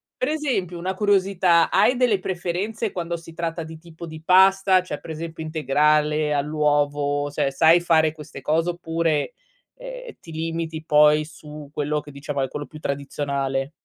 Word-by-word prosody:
per 255 - -2
esempio 260 - -2
una 185 +2 -3
curiosità, 190 -4 +2
hai 210 +6 +4
delle 245 -6 +2
preferenze 190 +5 -3
quando 170 -1 -3
si 165 0 -13
tratta 165 0 -3
di 160 0 -10
tipo 170 0 -11
di 160 -1 -9
pasta? 190 +1 +5
Cioè 150 -5 -6
per - - -13
esempio 160 0 -6
integrale 150 0 +1
all'uovo 145 -1 0
se 140 - 0
sai 160 +5 +5
fare 160 -2 +3
queste 150 -3 -11
cose 160 +5 +1
oppure, 165 +1 -1 0.4
ehm, - - -9
ti 165 - -13
limiti 160 0 -4
poi 150 -1 +5
su 150 -1 -11
quello 150 0 -1
che 145 0 -12
diciamo 140 0 -4
è 135 - 0
quello 145 +2 -6
più 155 - -12
tradizionale? 140 -1 -3
160 Hz, 160 wpm, -23 LUFS, 150-180 Hz, 0.4 s, pasta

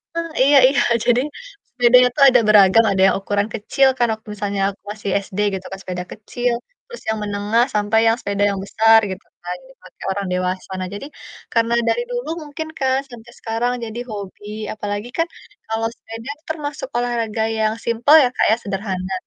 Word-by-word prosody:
Heeh, 335 0 -2
iya 280 +1 +6
iya 275 - +2 0.2
jadi 245 +1 +4 0.5
sepedanya 250 0 +6
tuh 285 - +4
ada 255 -1 +5
beragam 210 +1 +6
ada 190 -1 +1
yang - - +2
ukuran 205 +1 0
kecil 250 +5 +2
kan 240 - +3
waktu 220 0 -11
misalnya 200 -1 -2
aku 195 - -11
masih 210 -1 -5 0.2
SD 195 +2 -7 0.2
gitu 185 - -7
kan 195 - -6
sepeda 180 -1 -5
kecil, 240 +3 -2 0.3
terus 480 0 -11
yang 220 - 0
menengah 205 +3 +1
sampai 210 +1 +2
yang 225 - +4
sepeda 200 0 -1
yang 195 - -4
besar 225 +2 +5
gitu 190 - -8 0.2
kan 180 +1 -4
dipake 265 - -19
orang 200 0 -3
dewasa. 185 +1 -2
Nah 185 - -3
jadi 240 +8 -7 0.5
karena 230 0 +2 0.2
dari 235 +1 +1
dulu 245 +5 -3 0.2
mungkin 315 +2 -6
kan 265 -1 +2
sampai 235 -1 -12
sekarang 230 +2 -1
jadi 225 +1 -6
hobi 205 -1 -8 0.3
apalagi 205 +1 -4
kan 330 0 +1 0.4
kalau 225 0 -1
sepeda 225 +4 -9 0.2
termasuk 295 -4 -4
olahraga 230 -2 -1 0.2
yang 215 0 +2
simpel 235 +6 +4
ya 250 - +2
Kak - - +3
ya, - - +5
sederhana 190 -2 -3
225 Hz, 180 wpm, -20 LUFS, 200-245 Hz, 0.5 s, iya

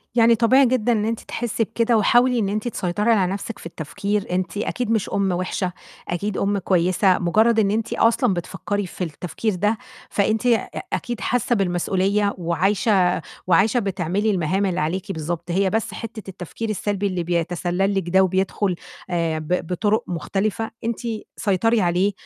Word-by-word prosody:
يعني 230 0 +6
طبيعي 260 +4 +5
جدًا 245 -1 +2
إن 215 -2 +1
أنتِ 225 0 -1
تحسّي 230 -1 -2
بكده، 230 +1 +1
وحاولي 240 +3 +4
إن 200 -3 0
أنتِ 215 +3 -2
تسيطري 210 0 0
على 190 -5 +3
نَفْسِك 205 +2 -6
في - - -13
التفكير، 200 +6 -3
أنتِ 185 +2 -2
أكيد 225 +2 -2
مش 220 -3 +1
أُمّ 195 -1 +1
وحشة، 180 +1 -1 0.4
أكيد 190 +3 -2
أُمّ 200 +1 +1
كويّسة، 185 +1 +2
مجرّد 220 +6 +3
إن 200 -2 +3
أنتِ 225 +1 -1
أصلًا 230 -1 +3
بتفكّري 190 +3 -3
في 180 - -5
التفكير 180 +6 -3
ده، 210 +5 +1 0.3
فأنتِ 215 +3 +1
أ 235 -2 +2 0.2
أكيد 240 -2 -3
حاسّة 245 +1 +1
بالمسؤولية، 195 +2 +1
وعايشة 185 +2 +2 0.3
وعايشة 195 +7 +4
بتعملي 195 +1 0
المهام 190 +1 0
اللي 185 -2 -1
عليكِ 175 +5 -2
بالضبط. 170 +1 -4
هي 195 +2 +2
بس 220 +2 -1
حتّة 220 -3 -7
التفكير 190 +4 -6
السلبي 205 -1 -1
اللي 185 -3 -2
بيَتَسَلّل 175 +3 0
لِك 185 -3 -1
ده 190 +2 +5
وبيدخل 190 +1 0 0.3
آآ، 165 -3 0
ب 165 +2 -2
بطُرُق 205 +5 +1
مختلفة، 200 +6 -2
أنتِ 230 +1 -1 0.4
سيطري 220 +3 +2
عليه، 180 +3 +2
200 Hz, 160 wpm, -22 LUFS, 180-220 Hz, 0.4 s, يعني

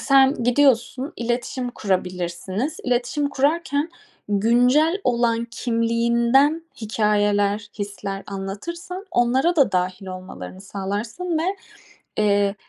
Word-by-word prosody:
sen 270 +1 +5
gidiyorsun, 260 +2 +2
iletişim 245 +1 -2
kurabilirsiniz. 185 - -2
İletişim 250 +4 0
kurarken 290 +2 0 0.4
güncel 245 - +3
olan 235 -1 +2
kimliğinden 235 +6 +2 0.2
hikâyeler, 205 -1 +1
hisler 200 -1 -4
anlatırsan, 335 - -6
onlara 260 +8 +2
da 280 - +4
dâhil 185 +1 -1
olmalarını 185 0 -8
sağlarsın 210 - -3
ve, 375 +5 -1 0.7
eee, 200 -1 +3
235 Hz, 90 wpm, -23 LUFS, 200-275 Hz, 0.7 s, sen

